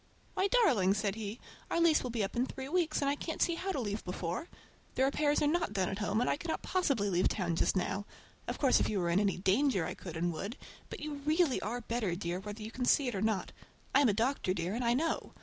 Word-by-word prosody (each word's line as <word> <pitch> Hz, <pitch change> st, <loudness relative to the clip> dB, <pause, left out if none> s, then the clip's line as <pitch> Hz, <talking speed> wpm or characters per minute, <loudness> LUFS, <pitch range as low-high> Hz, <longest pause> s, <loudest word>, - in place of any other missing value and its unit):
"Why 385 Hz, -, +2 dB
darling!" 255 Hz, -, +4 dB
said 205 Hz, -1 st, 0 dB
he, 215 Hz, +1 st, -5 dB, 0.3 s
"our -, -, +1 dB
lease 335 Hz, -2 st, +5 dB
will 250 Hz, -, -4 dB
be 230 Hz, -3 st, -1 dB
up 195 Hz, -, -4 dB
in 245 Hz, +2 st, +1 dB
three 265 Hz, 0 st, -6 dB
weeks, 325 Hz, -1 st, +1 dB
and 280 Hz, -, +2 dB
I -, -, +2 dB
can't 320 Hz, +2 st, -5 dB
see 340 Hz, -, +3 dB
how 375 Hz, +3 st, -2 dB
to 365 Hz, -, -2 dB
leave 210 Hz, -3 st, -3 dB
before. 180 Hz, -, -4 dB, 0.5 s
"The 260 Hz, -, +2 dB
repairs 290 Hz, +2 st, +2 dB
are -, -, +3 dB
not 335 Hz, -5 st, 0 dB
done 190 Hz, -3 st, 0 dB
at 195 Hz, -, -4 dB
home, 210 Hz, +1 st, 0 dB
and 245 Hz, -, +1 dB
I -, -, +1 dB
cannot 320 Hz, +1 st, -4 dB
possibly 275 Hz, -, +1 dB
leave 180 Hz, -2 st, +2 dB
town 175 Hz, -5 st, -1 dB
just -, -, +1 dB
now. 195 Hz, +2 st, -1 dB, 0.4 s
Of -, -, -3 dB
course 270 Hz, -3 st, +4 dB
if -, -, +1 dB
you 210 Hz, -, 0 dB
were 170 Hz, -1 st, 0 dB
in 175 Hz, -, +3 dB
any 200 Hz, -2 st, +1 dB
danger 195 Hz, -, +2 dB
I -, -, -3 dB
could 170 Hz, -3 st, -8 dB
and 175 Hz, +1 st, 0 dB
would, 200 Hz, -, -5 dB, 0.3 s
but -, -, -7 dB
you 295 Hz, -1 st, -5 dB
really 310 Hz, -1 st, +2 dB
are 235 Hz, +5 st, -3 dB
better, 225 Hz, -6 st, -1 dB
dear, 175 Hz, 0 st, -3 dB
whether 210 Hz, +2 st, -7 dB
you 220 Hz, -, -6 dB
can 250 Hz, +1 st, -2 dB
see 270 Hz, +1 st, +4 dB
it -, -, -5 dB
or 195 Hz, -, -2 dB
not. 220 Hz, -3 st, 0 dB, 0.4 s
I 280 Hz, -, +6 dB
am 270 Hz, -, +5 dB
a -, -, +3 dB
doctor, 225 Hz, -4 st, 0 dB
dear, 175 Hz, +1 st, -2 dB
and 240 Hz, +3 st, -2 dB
I 235 Hz, 0 st, +3 dB
know. 320 Hz, +5 st, -1 dB
225 Hz, 265 wpm, -32 LUFS, 195-290 Hz, 0.5 s, I